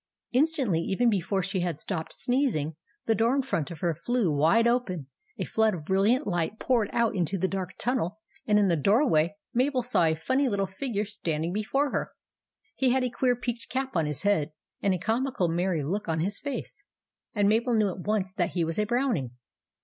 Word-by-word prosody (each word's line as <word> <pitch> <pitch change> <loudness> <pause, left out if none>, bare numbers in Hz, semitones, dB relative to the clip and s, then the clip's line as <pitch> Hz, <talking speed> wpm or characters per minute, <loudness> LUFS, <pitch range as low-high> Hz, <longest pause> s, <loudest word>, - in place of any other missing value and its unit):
Instantly, 265 - +2
even 230 +7 +2
before 190 0 0
she 195 +1 -2
had 175 -4 -2
stopped 160 -3 -3
sneezing, 245 - 0 0.3
the 225 - +3
door 230 +4 +2
in 275 - +1
front 175 - -2
of 170 -4 -9
her 170 -2 +1
flew 235 +1 0
wide 165 +11 +4
open, 220 - 0 0.3
a - - -2
flood 220 -2 +2
of 155 -4 -8
brilliant 205 - +2
light 175 +3 -1
poured 230 -5 +1
out 230 -2 +1
into 185 +1 0
the 190 +1 +1
dark 190 -1 -4
tunnel, 220 -6 -1 0.3
and 210 -1 +4
in 205 -1 +4
the 175 - +3
doorway 195 - +3 0.2
Mabel 255 +1 +1
saw 240 -8 +2
a 160 0 +2
funny 260 - +1
little 200 -2 0
figure 205 +2 -3
standing 170 -5 -3
before 270 +8 0
her. - - -2 0.6
He 265 - +2
had 260 +1 +2
a 250 - -1
queer 250 +1 +2
peaked 240 -1 -5
cap 265 -2 -3
on 165 -3 +2
his 150 +2 -4
head, 160 -7 +1 0.3
and 195 -2 +2
a - - -2
comical, 225 +1 0
merry 175 -2 0
look 195 +9 -2
on 160 0 0
his 195 +5 -2
face; 285 -2 -6 0.5
and 205 -1 +3
Mabel 230 +3 +2
knew 215 -2 +3
at 185 - -6
once 195 -1 -1
that 180 -4 -1
he 175 - +1
was 165 +4 -2
a 210 - +2
Brownie. 240 - 0
205 Hz, 205 wpm, -27 LUFS, 175-245 Hz, 0.6 s, wide